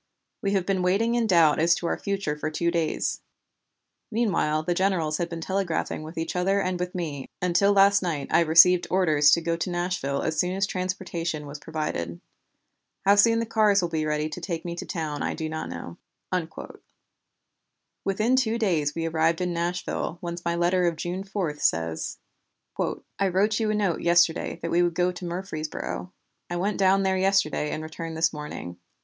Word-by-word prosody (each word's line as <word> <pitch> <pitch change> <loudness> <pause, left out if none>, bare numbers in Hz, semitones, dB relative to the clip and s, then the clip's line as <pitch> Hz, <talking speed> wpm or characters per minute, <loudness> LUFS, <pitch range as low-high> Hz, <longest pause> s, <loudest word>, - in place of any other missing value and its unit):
We 200 0 0
have 190 -3 +1
been 190 -1 0
waiting 200 +6 +2
in 235 -2 +1
doubt 165 -6 +5
as 170 +1 +4
to 170 - -5
our - - +1
future 195 -7 -2
for 150 +1 -3
two 170 +2 0
days; 165 -2 -1 0.9
meanwhile 195 -9 +1
the 175 - 0
generals 175 -5 +1
had 175 -1 -1
been 170 -1 -6
telegraphing 190 -4 -2
with 155 +2 -9
each 165 +1 -3
other 195 +3 +2
and 185 -2 -1
with 180 +1 -4
me, 150 -6 -4
until 180 +3 +3
last 200 0 +5
night 160 -6 -2
I - - +5
received 170 +2 +6
orders 155 -6 +4
to 170 - +4
go 165 0 0
to 170 +2 -3
Nashville 175 -6 -2
as 160 -1 -1
soon 180 +1 +1
as 195 +1 +1
transportation 180 -4 -3
was 145 +1 -8
provided. 115 - -4 0.9
How 200 - +7
soon 230 +3 +5
the 230 - 0
cars 215 -3 +3
will 175 - -1
be 155 -2 -1
ready 150 0 0
to 165 +3 -7
take 170 -2 -4
me 170 - -3
down 160 -4 -4
I - - -1
do 160 - -3
not 155 0 -4
know." - - -7 2.1
Within 215 +6 +1
two 230 -3 +1
days 165 -10 0
we 165 0 -2
arrived 165 0 +1
in 180 -1 -1
Nashville 170 0 -2
whence 170 0 -6
my 170 0 0
letter 175 +1 +2
of 170 - 0
June 175 +4 -4
4 190 -7 -3
says: 80 - -1 1.0
"I 200 - +3
wrote 205 +4 +1
you 220 -1 0
a 215 - +1
note 200 -5 0
yesterday 170 -1 +2
that 165 - -2
we 175 - +3
would 175 -1 +1
go 180 +1 +2
to 180 0 -8
Murfreesboro. 175 0 -5 0.4
I 175 - -3
went 195 +4 -1
down 195 0 +4
there 190 0 +1
yesterday 190 -6 +2
and 155 - -4
returned 160 +1 -6
this 165 +1 +2
morning. 150 - -7
175 Hz, 190 wpm, -26 LUFS, 160-190 Hz, 2.1 s, How